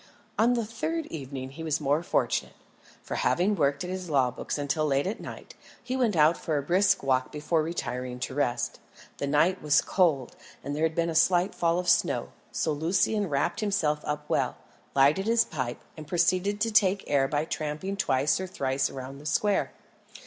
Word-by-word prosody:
On 235 +3 +4
the 235 -2 -1
third 315 +9 -3
evening 135 -3 -6
he 160 +4 -8
was 155 -1 0
more 145 +1 +1
fortunate, 175 - -1 0.5
for - - -6
having 190 +4 +2
worked 140 -1 +1
at 180 - -5
his 185 -2 -5
law 135 -4 +2
books 125 - -4
until 145 +2 -1
late 140 -1 +1
at 200 +4 -3
night, - - -9 0.3
he 250 +1 -3
went 240 -6 +1
out 155 +1 +5
for 155 -3 -1
a 140 - -1
brisk 185 +5 +2
walk 130 -1 +1
before 155 +2 0
retiring 125 -6 -4
to 130 - -3
rest. 130 -3 -1 0.4
The 140 - -1
night 165 +6 +2
was 150 -1 +4
cold, 155 -9 +1 0.3
and 145 +1 -4
there 150 - -3
had 160 0 +1
been 170 0 +1
a - - -4
slight 175 +3 +3
fall 170 0 +1
of 180 0 -2
snow, 170 0 +2 0.2
so 160 - -1
Lucian 185 +6 +1
wrapped 140 +7 0
himself 195 -9 0
up 150 0 -3
well, - - 0 0.4
lighted 145 +9 +4
his 230 0 +4
pipe, 130 -6 -4
and 155 -2 -10
proceeded 185 +4 +1
to 225 0 +1
take 200 -2 +3
the - - -13
air 140 -2 +3
by 145 +2 -1
tramping 155 +5 -3
twice 140 -5 +1
or 190 - -4
thrice 135 -6 -1
round 135 +1 -8
the 150 - -7
square. 205 +6 +1
155 Hz, 195 wpm, -27 LUFS, 140-185 Hz, 0.5 s, out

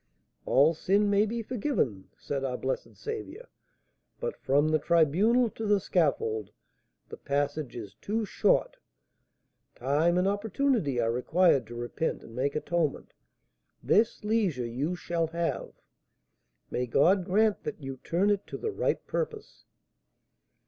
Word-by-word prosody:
'All 145 +5 +5
sin 200 +5 +2
may 205 +2 +3
be 230 +1 -3
forgiven,' 205 - -2
said 140 -1 -4
our 125 -2 -2
blessed 130 0 -4
Saviour, 445 0 -6 0.7
but 485 -1 -3
from 145 +3 +2
the 155 0 +2
tribunal 180 - +3
to 225 - -5
the 205 -1 +4
scaffold 115 - 0 0.6
the - - -8
passage 145 -1 -2
is 105 -5 -7
too 220 +2 -1
short, - - +1 1.0
time 150 +7 +2
and 180 +1 +2
opportunity 205 - 0
are 115 -1 +2
required 135 +1 +2
to 120 - -9
repent 120 +7 -3
and 115 - -12
make 140 +3 -1
atonement; 155 -1 -1 0.7
this 225 +1 +2
leisure 205 - 0
you 135 +9 -2
shall 170 -2 -1
have. 170 +1 -3 1.0
May 125 0 -1
God 180 +10 +4
grant 210 +4 +2
that - - -5
you 135 -2 -6
turn 185 +9 +1
it 200 -1 -1
to - - -6
the 445 - -3
right - - -1
purpose!" 455 -3 -5
170 Hz, 135 wpm, -28 LUFS, 135-215 Hz, 1.0 s, All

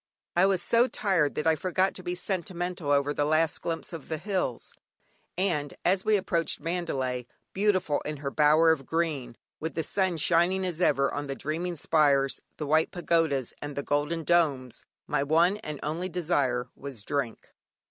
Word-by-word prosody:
I 180 +2 +5
was 190 -3 +1
so 235 +2 +4
tired 190 - +1
that 150 - -2
I 160 - +5
forgot 185 +4 0
to - - -8
be 175 0 -3
sentimental 180 -3 -3
over 145 0 +2
the 145 - 0
last 155 +1 +1
glimpse 165 +1 -4
of 160 -4 -8
the 160 - -1
hills; 185 - -3 0.6
and 160 -7 -1
as 185 +1 +3
we 215 -1 +3
approached 170 -3 0
Mandalay, 135 -8 -2 0.3
beautiful 190 -7 +1
in 150 0 -5
her 140 -1 -4
bower 155 +2 +5
of 135 -5 -2
green, 150 -8 -1 0.2
with 160 +1 -4
the 160 - -1
sun 185 +1 0
shining 175 +4 +2
as 175 -1 -3
ever 140 -5 +3
on 145 0 -3
the 135 - -3
"dreaming 170 +5 -3
spires," 140 -3 +2 0.2
the 150 - -3
white 155 +2 +3
pagodas, 165 -7 0
and 145 -1 -6
the 140 - -3
golden 150 +4 -1
domes, 145 -8 +1 0.2
my - - 0
one 165 +7 +3
and 150 -8 -6
only 170 +5 -2
desire 145 -9 0
was 135 -7 -6
"Drink." 130 -3 -3
160 Hz, 175 wpm, -28 LUFS, 145-180 Hz, 0.6 s, I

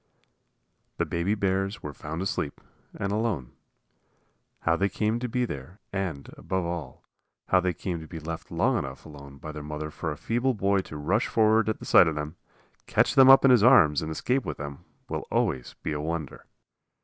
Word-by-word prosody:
The - - +1
baby 85 +5 0
bears 95 +1 -1
were 75 - -5
found 80 +6 -5
asleep, 75 -6 -3 0.4
and 100 - -1
alone. 105 - -1 1.1
How 85 - +2
they 100 +3 +1
came 110 +4 0
to 125 0 -3
be 125 +2 0
there, 75 - -8
and, 90 -8 -3
above 95 -2 -2
all, 85 -4 -5 0.5
how 95 - +5
they 90 -1 -1
came 90 -1 -4
to 80 - -10
be 80 - -7
left 80 +1 -6
long - - +1
enough 65 0 -7
alone 70 -3 -11
by 75 +3 -7
their 75 0 -7
mother 75 +1 -5
for 80 +1 -4
a 75 - -6
feeble 120 - 0
boy 100 -1 +2
to 75 -5 -6
rush 95 +10 +1
forward 110 0 +3
at 110 - -3
sight 90 - +7
of 80 - -1
them, 75 +2 -4 0.5
catch - - +2
them 135 0 +7
up 135 +1 +8
in 135 - +7
his 125 -4 +6
arms 75 - +6
and 80 - -4
escape 125 +11 0
with - - -5
them, 70 -1 -7 0.2
will - - -4
always 65 -2 -1
be - - -2
a 75 -1 -2
wonder. 80 -1 -5
85 Hz, 195 wpm, -27 LUFS, 75-105 Hz, 1.1 s, up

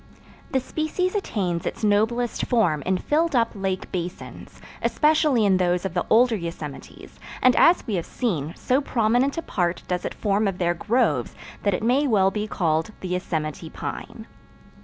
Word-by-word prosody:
The 265 - +1
species 315 +7 -2
attains 190 - -2
its - - -5
noblest 220 +3 +1
form 190 - +2
in 190 0 +2
filled 315 - 0
up 230 -1 +3
lake 195 -2 -3
basins, 180 0 -6 0.2
especially 300 -7 +3
in 190 -2 +4
those 180 0 +1
of 190 - -3
the 175 - -1
older 235 +1 +5
yosemites, 165 -6 -8 0.2
and 255 -1 +4
as 345 - +5
we 220 - -3
have 170 - -3
seen, 170 - -2
so 260 +3 +1
prominent 245 +3 +1
a 330 - -2
part 175 -2 -1
does 180 -1 -2
it - - -4
form 205 0 +1
of 195 -2 -2
their 175 -1 +1
groves 190 - 0 0.3
that 200 -2 +1
it - - -4
may 265 +5 +3
well 195 -5 +3
be 210 +1 -3
called 160 -5 0
the 185 - -5
Yosemite 160 -3 -3
Pine. - - -7
205 Hz, 170 wpm, -24 LUFS, 175-245 Hz, 0.3 s, older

